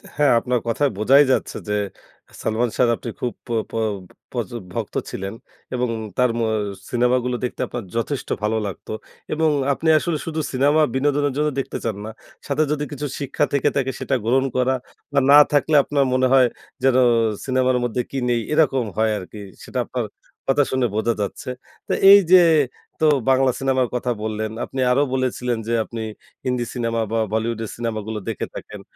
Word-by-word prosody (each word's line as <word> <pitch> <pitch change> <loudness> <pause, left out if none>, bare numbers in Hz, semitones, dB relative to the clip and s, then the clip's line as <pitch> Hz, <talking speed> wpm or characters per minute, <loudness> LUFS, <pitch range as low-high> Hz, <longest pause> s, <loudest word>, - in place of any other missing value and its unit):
হ্যাঁ, 145 -2 +4
আপনার 125 +1 0
কথায় 140 +5 +2
বোঝাই 135 +7 +6
যাচ্ছে - - 0
যে - - +1 0.7
'সালমান 115 +2 0
সাহ' 125 - +3
র - - +4
আপনি 120 - -6
খুব 125 - -2
প - - -18 0.2
প - - -23 0.6
প্রচুর 120 -1 -4
ভক্ত - - -4
ছিলেন 95 +1 -5 0.4
এবং 125 0 0 0.3
তার 125 0 +4
ম - - 0
আ - - 0 0.4
সিনেমাগুলো 125 0 +1
দেখতে 125 - -3
আপনার 120 -1 -5
যথেষ্ট 125 +4 -2
ভালো 110 +1 +1
লাগত। 100 - -8 0.5
এবং 160 +1 +2 0.2
আপনি 160 +4 -1
আসলে 165 0 -1
শুধু 160 -1 -3
সিনেমা 145 +4 +3
বিনোদনের 145 +1 +1
জন্য 150 0 +2
দেখতে 135 - -3
চান 110 -3 -1
না। - - -5 0.4
সাথে 145 +2 +2
যদি 150 -1 0
কিছু 145 0 -4
শিক্ষা 140 +1 0
থেকে 140 - +3
থাকে 135 -2 0
সেটা 135 - 0
গ্রহণ 130 +3 +3
করা 130 +1 +2 0.4
বা 140 - +4
না 145 - +10
থাকলে 150 +1 +2
আপনার 140 -1 +1
মনে 130 0 +3
হয় 130 -2 +6 0.4
যেনো 130 -1 +4 0.4
সিনেমার 130 -1 +2
মধ্যে 120 +1 0
কি 135 - -3
নেই 120 -1 +2
এরকম 135 -5 +3
হয় 110 0 +2
আর 100 - -6
কি। 105 - -9 0.2
সেটা - - -4
আপনার - - -3 0.4
কথা 135 +2 +4
শুনে 130 -1 +1
বোঝা 115 +2 +1
যাচ্ছে। 105 +6 -4 0.4
তো - - -3 0.2
এই 200 - +10
যে 185 - +10 0.6
তো 160 - +2 0.2
বাংলা 130 0 +4
সিনেমার 130 -2 +1
কথা 125 0 -1
বললেন 110 0 -2
আপনি 135 - -7
আরও 135 +3 +4
বলেছিলেন 125 -2 -1
যে, 115 - 0
আপনি 115 +1 -7 0.4
হিন্দি 125 -1 0
সিনেমা 115 -2 -1
বা 115 - 0 0.2
বলিউডের 110 0 -1
সিনেমাগুলো 110 -2 -3
দেখে - - -3
থাকেন। - - -8
125 Hz, 180 wpm, -22 LUFS, 115-140 Hz, 0.7 s, না